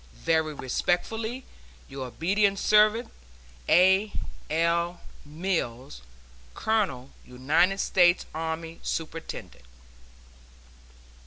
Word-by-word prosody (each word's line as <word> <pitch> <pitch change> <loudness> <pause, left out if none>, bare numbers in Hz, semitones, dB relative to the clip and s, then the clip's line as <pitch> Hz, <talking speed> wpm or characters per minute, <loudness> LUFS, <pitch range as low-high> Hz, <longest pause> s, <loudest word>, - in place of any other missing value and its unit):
Very 160 -2 +1
respectfully, 220 - -2 0.4
Your 135 -1 -6
obedient 195 - +1
servant, 215 +3 +3 0.6
A. 190 +4 +5 0.4
L. 170 +2 0 0.3
MILLS, 145 - -3 0.5
Colonel 185 - -1
United 150 +10 +1
States 175 -2 +3
Army, 160 +1 -4
Superintendent. 165 - -6
170 Hz, 70 wpm, -27 LUFS, 155-195 Hz, 0.6 s, A